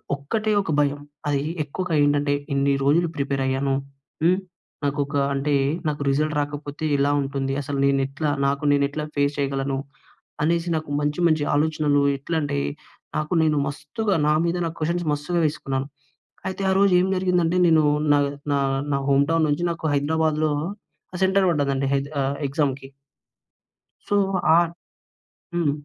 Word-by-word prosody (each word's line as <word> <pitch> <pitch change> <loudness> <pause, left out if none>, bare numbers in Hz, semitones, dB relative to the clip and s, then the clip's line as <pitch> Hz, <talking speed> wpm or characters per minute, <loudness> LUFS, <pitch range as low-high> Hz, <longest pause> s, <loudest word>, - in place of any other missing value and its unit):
ఒక్కటే 215 +11 -2
ఒక 180 - -4
భయం. 145 0 +1 0.3
అది 145 -1 +1 0.2
ఎక్కువగా 170 +4 -4
ఏంటంటే, 145 0 +2 0.2
ఇన్ని 140 0 +2
రోజులు 160 +5 +3
ప్రిపేరయ్యాను. 135 -1 0 0.5
హ్మ్, 180 +3 +4 0.4
నాకొక 145 +1 -1 0.2
అంటే, 140 +1 0 0.3
నాకు 150 -1 -2
రిజల్ట్ 150 +3 +1
రాకపోతే 145 +1 -5
ఎలా 140 +1 +2
ఉంటుంది, 135 0 -2
అసలు 140 0 -3
నేను 140 0 +3
ఎట్లా? 145 +3 -2 0.2
నాకు 140 +1 -1
నేను 140 0 +3
ఎట్లా 150 +1 -4
ఫేస్ 140 0 +1
చేయగలను, 135 -1 -1 0.7
అనేసి 170 +2 +1
నాకు 155 -2 -4
మంచి, 150 +2 -1
మంచి 155 -2 +2
ఆలోచనలు 150 -1 +2 0.2
ఎట్లా 150 +5 -4
అంటే 145 - -1 0.6
నాకు 155 +2 -1
నేను 155 -1 +2
మస్తుగా 200 +9 -2
నా 150 - +4
మీద 170 +1 0
నాకు 165 0 -4
క్వెషన్స్ 170 +2 -1
మస్తుగా 150 +4 -1
వేసుకున్నాను. 135 -3 -2 0.6
అయితే 190 +1 -5
ఆ - - +3
రోజు 200 -1 +4
ఏం 185 - +2
జరిగిందంటే, 180 -2 +1
నేను 160 -2 +5 0.3
నా 145 - +5 0.3
నా 140 - +2 0.3
నా 140 - +2
హోమ్ 140 0 +4
టౌన్ 165 -1 +3
నుంచి 145 +3 0
నాకు 165 -1 -6
హైదరాబాద్‍లో 155 +1 +1 0.6
ఆహ్, 180 - -5
సెంటర్ 190 0 +3
పడ్డదండి 140 -3 0
హెద 140 0 0 0.2
ఆహ్ 135 +1 -1
ఎగ్జామ్‍కి. 135 -1 -1 1.2
సో, 205 - +2 0.4
ఆ - - +7 1.0
హ్మ్. 170 -4 +1
145 Hz, 150 wpm, -23 LUFS, 140-165 Hz, 1.2 s, ఆ